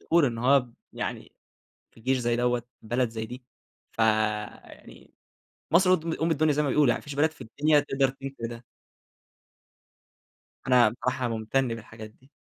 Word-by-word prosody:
فخور 165 -4 +3
إنّه 120 0 -2
هو 125 -2 0 0.2
يعني - - -5 0.6
في - - -19
جيش 130 +3 +1
زي 120 -1 0
دوّة، 120 0 +1 0.2
بلد 120 +3 0
زي 110 0 -5
دي، 125 +2 -10 0.5
فيعني 110 -1 -2 0.6
مصر 185 +2 +5
قد 160 - -9
أم 165 +1 0
الدنيا 155 -1 +2
زي 150 - +1
ما 140 - 0
بيقولوا، 145 0 +3
يعني 120 - +1
ما - - -17
فيش 145 -2 -7
بلد 155 +2 +2
في - - -18
الدنيا 145 +7 +2
تقدر 135 -2 +1
تنفي 135 -3 -7
ده. 120 +1 -9 2.0
أنا 125 -3 +5
بصراحة 125 +2 -2
ممتن 115 +4 -1
بالحاجات 110 -1 -8
دي. 130 +5 -26
125 Hz, 160 wpm, -27 LUFS, 115-140 Hz, 2.0 s, مصر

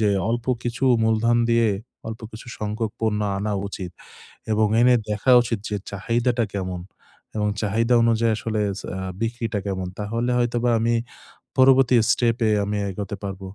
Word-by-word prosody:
যে 105 - +3 0.2
অল্প 120 0 -1 0.2
কিছু 120 +3 -2 0.2
মূলধন 110 +1 +2
দিয়ে 115 -1 +4 0.4
অল্প 110 0 -6
কিছু 110 - -10
সংখ্যক 105 +1 -2
পণ্য 110 -2 0 0.2
আনা 105 +1 -2 0.2
উচিত 95 -3 -6 0.6
এবং 110 0 +3
এনে 125 +1 +6 0.2
দেখা 105 +5 +1
উচিত 115 -2 -2
যে 105 - -2
চাহিদাটা 115 +3 0
কেমন 95 -2 -3 0.6
এবং 105 -1 +1
চাহিদা 115 +3 +1
অনুযায়ী 115 0 +3
আসলে 110 0 -2 0.2
চ - - -11
আ - - -4 0.2
বিক্রিটা 115 -2 -2
কেমন। 95 -2 -3
তাহলে 115 +4 -2
হয়তোবা 120 0 +1
আমি 115 +1 +1 0.6
পরবর্তী 130 -1 +6 0.2
step-এ 115 -2 +2
আমি 105 +1 -2
এগোতে 100 +2 -5
পারব। 95 -1 -5
110 Hz, 150 wpm, -23 LUFS, 105-120 Hz, 0.6 s, এনে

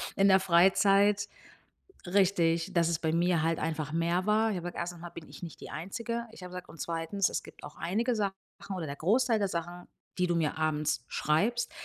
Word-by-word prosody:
in 195 - +4
der 190 0 +6
Freizeit. 195 +3 +4 0.8
Richtig, 175 -2 +2
dass 170 -2 +3
es 170 -2 0
bei 160 -1 -1
mir 170 -1 +2
halt 165 0 +1
einfach 155 -2 -2
mehr 170 +3 0
war. 220 +1 +3
Ich 205 - -2
habe 175 - -5
gesagt: 175 - -8
„1. 175 0 -4
mal 175 0 -8
bin 165 -2 -10
ich - - -12
nicht 165 - -10
die - - -9
Einzige“ 230 +9 -4
ich 200 - -13
habe 180 - -8
gesagt, 180 0 -8
„und 160 -1 -13
2., 170 +4 -1
es - - -3
gibt - - -14
auch 145 - -10
einige 230 +8 0
Sachen 200 -2 0 0.4
oder 170 -3 -4
der 140 -1 -5
Großteil 225 - +2
der 200 -2 0
Sachen, 175 0 -5 0.3
die 180 - +3
du 175 - 0
mir 160 -3 0
abends 155 -1 0
schreibst, 215 +11 +1
175 Hz, 215 wpm, -30 LUFS, 165-200 Hz, 0.8 s, der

